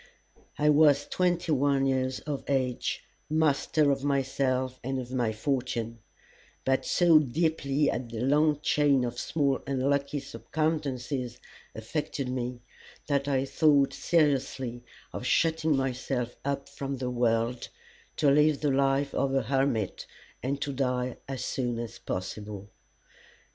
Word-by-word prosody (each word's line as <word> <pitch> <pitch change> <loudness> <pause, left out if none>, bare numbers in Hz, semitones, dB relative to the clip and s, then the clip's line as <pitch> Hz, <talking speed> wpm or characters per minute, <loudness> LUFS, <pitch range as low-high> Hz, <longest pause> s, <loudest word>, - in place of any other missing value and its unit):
I 150 0 +3
was 145 -1 +5
twenty 175 -1 0
one 140 -1 +2
years 130 -1 0
of 145 -2 -4
age, 130 -3 -1 0.3
master 155 -1 +2
of 135 0 -1
myself 130 -2 0
and 135 +2 -2
of 125 -1 -7
my 120 -4 0
fortune; 115 -1 -2 0.7
but 135 0 +1
so 170 -3 +5
deeply 150 0 0
had 120 -2 -1
the 115 -1 -5
long 150 +3 +3
chain 145 -4 +3
of 120 0 -3
small 140 -4 0
unlucky 140 +1 0
circumstances 135 -4 -3 0.4
affected 130 +3 -3
me 125 -1 -3 0.4
that 140 -1 0
I 135 -1 +1
thought 145 -1 +3
seriously 135 -6 0 0.3
of - - -5
shutting 160 -3 +2
myself 125 -2 -2
up 140 0 -2
from 140 -1 -5
the 125 -1 -3
world 120 0 0 0.5
to 145 -2 +3
live 150 0 +4
the 145 -2 +2
life 135 +1 +1
of 135 0 0
a 135 - +2
hermit 135 -6 0 0.3
and 135 +3 -2
to 140 - -3
die 125 -2 -1
as 130 -3 -4
soon 120 -3 -2
as 115 0 -6
possible. 100 +2 -5
135 Hz, 135 wpm, -28 LUFS, 125-145 Hz, 0.7 s, was